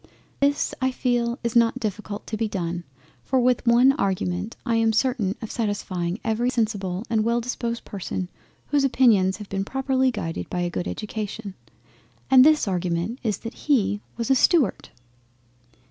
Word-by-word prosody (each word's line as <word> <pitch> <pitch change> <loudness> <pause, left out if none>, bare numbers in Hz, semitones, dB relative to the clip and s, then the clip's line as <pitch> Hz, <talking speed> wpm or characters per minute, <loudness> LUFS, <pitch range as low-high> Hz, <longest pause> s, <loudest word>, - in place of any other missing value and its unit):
This, 285 +1 +1
I 260 - +2
feel, 240 -2 0
is 235 0 -2
not 230 -1 +4
difficult 210 -1 -4
to 220 - -4
be 220 +1 -1
done, 175 -3 -3 0.4
for 260 - +1
with 250 -1 +2
one 245 +3 +6
argument 195 -3 -2
I 230 -2 +1
am 225 0 +3
certain 220 -4 +1
of 220 - -5
satisfying 195 -4 -2
every 225 +2 0
sensible 205 -6 -1
and 225 -2 +1
well 235 +1 +1
disposed 235 -1 -4
person 190 -2 -4 0.4
whose 290 -1 +2
opinions 220 -8 +4
have 210 -1 -10
been 195 0 -1
properly 265 +3 +1
guided 165 -9 -4
by 180 - -2
a 175 0 -1
good 175 - -3
Education—and 215 +4 -1
this 305 -4 +4
Argument 180 +5 -1
is 220 -5 -1
that 230 - -4 0.2
he 210 -6 +2 0.2
was 230 +1 -1
a - - +6
STUART. 270 - +2
225 Hz, 160 wpm, -24 LUFS, 195-245 Hz, 0.4 s, one